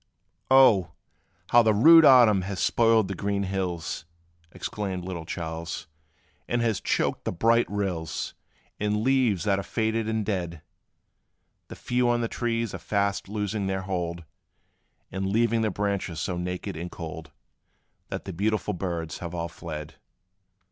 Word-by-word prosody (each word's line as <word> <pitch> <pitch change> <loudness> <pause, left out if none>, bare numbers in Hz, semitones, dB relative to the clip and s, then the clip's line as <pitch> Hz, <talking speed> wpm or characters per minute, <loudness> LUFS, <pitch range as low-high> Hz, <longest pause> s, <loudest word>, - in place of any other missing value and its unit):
"Oh! 115 - +5 0.6
how 120 - +7
the 110 -2 +3
rude 160 +8 +8
autumn 120 -8 +7
has 95 0 -4
spoiled 115 -3 +3
the 100 - -3
green 100 +1 -1
hills!" 90 -5 -3 0.5
Exclaimed 95 -3 -4
little 90 -3 -5
Charles, 80 0 -5 0.6
"and 120 - 0
has 110 -5 0
choked - - 0
the - - -2
bright 115 +6 +2
rills 95 -6 -3 0.5
With 105 0 0
leaves 115 -3 +2
that 100 -2 +1
are - - -1
faded 110 +1 -1
and 110 -1 -1
dead! 85 -6 -3 1.0
The - - -9
few 125 0 0
on 120 0 +2
the 115 - 0
trees 115 -2 -2
are 95 - -5
fast 100 +2 -1
losing 105 -1 -2
their 95 0 -1
hold, 85 -3 -3 0.9
And 95 +1 -2
leaving 115 +3 +2
the 110 - +1
branches 100 -4 -2
so 90 +3 -2
naked 90 +2 -4
and 85 +2 -5
cold, 80 -3 -8 0.8
That - - -5
the - - -5
beautiful 105 +3 -1
birds 85 -3 -4
have 85 0 -6
all 85 0 -3
fled." 80 -2 -8
100 Hz, 150 wpm, -26 LUFS, 90-110 Hz, 1.0 s, rude